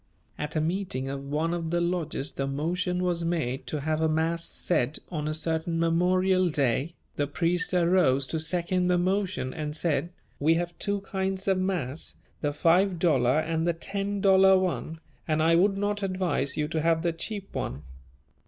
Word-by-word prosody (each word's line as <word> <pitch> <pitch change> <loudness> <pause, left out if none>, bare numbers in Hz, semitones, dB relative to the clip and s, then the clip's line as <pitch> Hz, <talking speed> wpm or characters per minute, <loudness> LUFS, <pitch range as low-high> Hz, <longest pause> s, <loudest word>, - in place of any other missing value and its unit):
At 150 +2 -5
a 155 - +2
meeting 165 -6 -2
of 135 0 -5
one 160 +3 0
of 165 -2 -3
the 175 +1 +1
lodges 170 -5 -2
the 135 - -2
motion 180 +6 -1
was 175 -2 0
made 155 -6 -2
to 150 - -3
have 155 +2 -1
a 160 - +2
mass 165 +2 0
said 155 -4 0
on 150 -3 -3
a 155 - -1
certain 165 +1 -1
memorial 185 +2 +2
day; 145 +2 0 0.2
the 145 - 0
priest 175 +4 0
arose 170 -7 +3
to 160 +4 -3
second 175 +3 0
the 180 0 +3
motion, 185 -7 -1
and 150 -1 -4
said, 165 +1 0 0.3
"We 160 +3 +3
have 175 0 -2
two 200 -1 0
kinds 190 0 -3
of 190 -1 +3
mass, 170 -7 -3 0.3
the 145 - 0
five 175 +5 +3
dollar 140 -6 +3
and 160 +1 0
the 170 - +2
ten 200 +3 -3
dollar 190 -1 +6
one, 165 -3 -2 0.3
and 155 -1 +1
I 165 +1 +4
would 195 +4 +3
not 205 +1 -1
advise 185 -7 0
you 150 -1 0
to 160 0 -1
have 165 0 +2
the 170 -1 +1
cheap 200 +3 -5
one." 70 +4 -4
170 Hz, 180 wpm, -27 LUFS, 155-185 Hz, 0.3 s, dollar